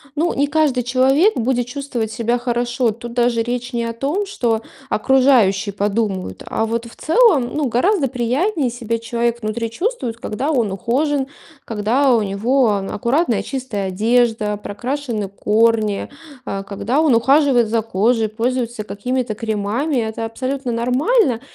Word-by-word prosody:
ну 330 +3 +1
не 285 +1 +1
каждый 290 -4 +2
человек 265 - +3
будет 245 0 0
чувствовать 250 -5 -4
себя 240 +1 0
хорошо. 240 0 0
Тут 235 +2 -7
даже 240 -1 +2
речь 245 +1 -3
не 235 -1 -1
о 230 - -3
том, 290 - -1
что 230 - -1 0.3
окружающие 220 -5 +3
подумают, 200 -1 -2
а 225 - -1
вот 230 +1 -2
в - - -14
целом, 315 - +3
ну 300 -1 0
гораздо 280 - +2
приятнее 260 - 0
себя 230 -1 -3
человек 235 +1 -2
внутри 225 +2 -2
чувствует, 250 - -3
когда 235 +5 -3
он 235 -8 +1
ухожен, 265 +7 0 0.4
когда 235 +5 +2
у 225 - +2
него 225 +6 +1
ан 200 -2 -1
аккуратная, 240 - 0
чистая 245 -8 -4
одежда, 220 +1 +1
прокрашены 235 +1 -4
корни, 215 0 +1 0.4
а, 195 0 -4
когда 210 +8 -1
он 305 -6 +4
ухаживает 260 0 +4
за 225 0 +1
кожей, 220 +2 +1
пользуется 235 0 -2
какими-то 245 +2 -3
кремами. 220 +7 -1
Это 225 -1 -2
абсолютно 260 +3 -3
нормально. 250 - +1
240 Hz, 145 wpm, -19 LUFS, 220-265 Hz, 0.4 s, он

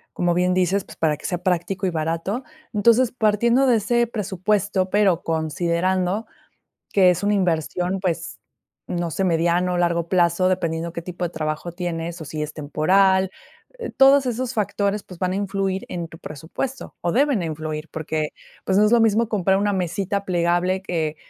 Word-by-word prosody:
como 175 -1 +1
bien 180 +1 +2
dices, 185 +2 +1
pues, - - -13
para 155 -2 +1
que - - -13
sea 180 - -2
práctico 185 +2 -1
y - - +1
barato. 165 +8 -2 0.3
Entonces, 235 +3 +4
partiendo 235 +3 +2
de 245 -3 +4
ese 235 +3 +2
presupuesto, 200 -3 -1
pero 200 -5 +3
considerando 175 +5 0 0.7
que 190 -2 +5
es 180 +1 -1
una 205 +1 +2
inversión, 180 0 0
pues, 180 -4 -3 0.5
no 175 -1 -2
sé, 195 - -1
mediano, 175 +1 +1
largo 170 -1 +1
plazo, 175 0 +3
dependiendo 170 -2 -1
qué 170 - -4
tipo 180 +1 -5
de 170 - -2
trabajo 155 +1 -3
tienes, 170 -1 -4
o, 160 - -7
si 155 +1 -4
es 150 0 -4
temporal, 190 +6 +2 0.7
todos 270 +1 +7
esos 250 +1 -2
factores, 205 -1 0
pues, 180 - -13
van 185 0 0
a - - -2
influir 195 -1 -2
en 170 -2 -4
tu 160 - -13
presupuesto, 165 - -6
o, 170 - 0
deben 270 -5 +2
influir 155 -1 -4
porque, 155 -1 -2 0.4
pues, 190 - +2
no 210 - +5
es 210 - +1
lo 240 - +6
mismo 225 0 +3
comprar 195 -3 +2
una 205 +1 +1
mesita 195 +2 -2
plegable 175 +1 +1
que, 160 -5 -2
185 Hz, 170 wpm, -22 LUFS, 170-205 Hz, 0.7 s, todos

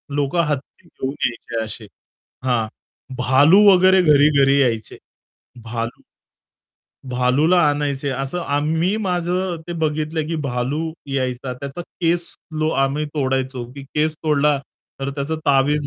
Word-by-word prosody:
लोकं 145 +4 +1
हत्ती 145 -2 -5
घेऊन 135 +1 -5
यायचे 115 -1 -3
असे. 110 0 -7 0.6
हां, 120 -4 +1 0.5
भालू 140 +10 +5
वगैरे 185 0 +6
घरी-घरी 140 -3 +5
यायचे. 115 -4 -1 0.7
भालू 115 +1 -4 1.1
भालूला 130 +8 +3
आणायचे, 145 -1 -1
असं 135 +6 -3
आम्ही 160 +7 0
माझं 180 0 -1
ते - - -3
बघितलं 155 0 -1
की 165 - -2
भालू 125 +4 -2 0.3
यायचा, 130 -1 -2
त्याचा 140 +5 -7
केस 170 0 -1 0.5
आम्ही 135 +3 +1
तोडायचो. 130 -3 -1
की 140 +1 -9
केस 155 +1 +1
तोडला 150 -1 +3 0.4
तर 135 0 -2
त्याच 140 +1 -4 0.2
तावीज 140 +1 +3
140 Hz, 115 wpm, -21 LUFS, 130-155 Hz, 1.1 s, वगैरे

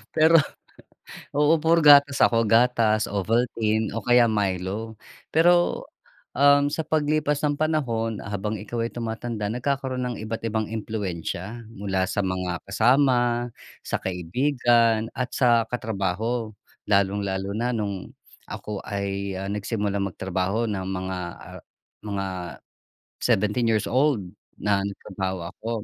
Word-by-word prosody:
Pero 160 +1 +6 0.9
oo, 150 +3 +4
puro 165 +1 +3
gatas 145 -1 +7
ako, 115 -1 +4
gatas, 115 -1 +3
Ovaltine, 110 +1 0
o 115 - -3
kaya 120 -1 +5
Milo. 100 +2 -2 0.4
Pero, 175 +2 +3 0.5
um, 145 +1 +5
sa 160 +2 -2
paglipas 150 -1 0
ng 145 -1 0
panahon 120 -9 -1
habang 100 +1 -3
ikaw 115 +3 -3
ay - - -5
tumatanda 115 -2 -4
nagkakaroon 130 +1 -2
ng - - -8
iba't 110 +1 -5
ibang 110 -1 -1
impluwensiya 105 0 -4
mula 95 -2 -1
sa 100 - -1
mga 90 -2 -2
kasama, 120 +1 +3 0.3
sa - - -2
kaibigan 115 - +1
at 125 0 -3
sa 120 -3 +3
katrabaho. 110 0 -2 0.3
Lalong-lalo 100 -1 0
na 120 +1 0
nung 100 -4 -4 0.3
ako 105 -1 -6
ay, 100 -1 -3
ah, 95 - -4
nagsimulang 100 -1 -2
magtrabaho 95 +4 -2
ng 95 -2 -3
mga, 95 0 -3 0.2
ah, - - -11 0.4
mga 100 -2 -2 1.0
17 105 +4 +2
years 110 -2 +1
old 130 -2 +2 0.4
na 100 -1 +1
nagtrabaho 95 -3 -4
ako. 115 - -7
110 Hz, 120 wpm, -24 LUFS, 100-125 Hz, 1.0 s, gatas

